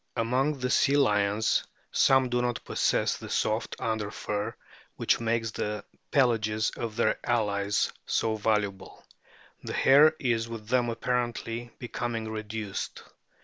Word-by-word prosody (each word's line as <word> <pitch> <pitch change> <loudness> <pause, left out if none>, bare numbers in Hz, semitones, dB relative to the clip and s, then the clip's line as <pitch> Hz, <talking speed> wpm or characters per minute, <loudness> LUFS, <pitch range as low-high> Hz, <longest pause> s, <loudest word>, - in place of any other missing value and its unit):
Among 130 +6 +1
the 125 -1 -2
Sea 140 +1 +4
lions 105 -4 +2 0.3
some 135 -1 +4
do 120 0 +1
not 120 -1 -2
possess - - +1
the - - -9
soft - - 0
under 110 -2 -2
fur 105 0 -3 0.4
which - - +1
makes 115 -1 0
the 105 -1 -3 0.3
pelages 110 -5 +2
of 115 -2 -5
their 120 - +1
allies 105 -3 0
so 110 -1 +1
valuable; 105 -3 -2 0.6
the - - -6
hair 150 +4 +6
is 115 -3 0
with 110 -2 -8
them 125 -1 +2
apparently 120 0 -2
becoming 115 -2 -4
reduced. 110 -1 -5
115 Hz, 130 wpm, -28 LUFS, 105-125 Hz, 0.6 s, hair